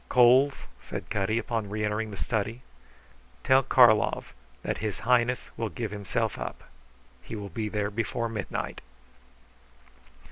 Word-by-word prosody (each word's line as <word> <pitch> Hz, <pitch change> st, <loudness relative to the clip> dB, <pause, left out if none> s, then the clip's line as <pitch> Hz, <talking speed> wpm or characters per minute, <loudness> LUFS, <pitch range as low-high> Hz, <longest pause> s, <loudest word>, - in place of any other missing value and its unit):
"Coles," 130 Hz, +3 st, +5 dB, 0.2 s
said -, -, -7 dB
Cutty 105 Hz, +1 st, +1 dB
upon 115 Hz, -3 st, -2 dB
reentering 105 Hz, +1 st, -1 dB
the 100 Hz, -, -8 dB
study, 115 Hz, +3 st, -2 dB, 0.8 s
"tell 130 Hz, +1 st, +5 dB
Karlov -, -, +4 dB, 0.3 s
that -, -, -2 dB
His 105 Hz, -4 st, -3 dB
Highness 125 Hz, +2 st, +2 dB
will 115 Hz, -1 st, -1 dB
give 110 Hz, 0 st, -4 dB
himself 105 Hz, -, -2 dB
up. -, -, -6 dB, 0.6 s
He 110 Hz, -, -7 dB
will 100 Hz, -2 st, -6 dB
be 105 Hz, +4 st, -3 dB
there 105 Hz, -1 st, -1 dB
before 115 Hz, +2 st, -1 dB
midnight." 110 Hz, -3 st, -4 dB
110 Hz, 130 wpm, -28 LUFS, 105-120 Hz, 0.8 s, Coles